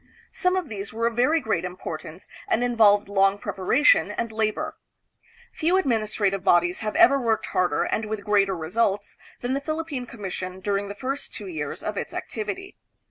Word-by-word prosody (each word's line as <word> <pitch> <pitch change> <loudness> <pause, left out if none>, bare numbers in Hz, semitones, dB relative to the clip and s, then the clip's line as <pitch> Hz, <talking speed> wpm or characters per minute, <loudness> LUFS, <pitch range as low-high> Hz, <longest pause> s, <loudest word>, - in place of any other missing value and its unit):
Some 365 -1 +1
of 370 -4 -1
these 200 -3 -6
were 230 +1 -2
of 230 -1 0
very 290 +7 +3
great 220 - -1
importance 175 -2 -7 0.2
and 240 - +1
involved 215 -5 +4
long 195 0 +3
preparation 285 - +3
and 230 -1 -3
labor. 220 -1 -1 0.8
Few 345 +4 +2
administrative 215 - 0
bodies 175 -1 +3
have 215 -1 -3
ever 325 -5 +6
worked 225 -2 +1
harder 180 -1 +1
and 220 - -1
with 215 -1 -4
greater 195 -2 +2
results 200 +5 -1 0.3
than 245 +1 -1
the 275 - -1
Philippine 310 -4 -4
Commission 190 -4 -6
during 200 +1 -1
the 200 - -6
first 270 +6 -4
two 210 - -7
years 155 -6 -5
of 210 -1 -3
its - - -4
activity. 370 - -5
215 Hz, 170 wpm, -25 LUFS, 195-245 Hz, 0.8 s, ever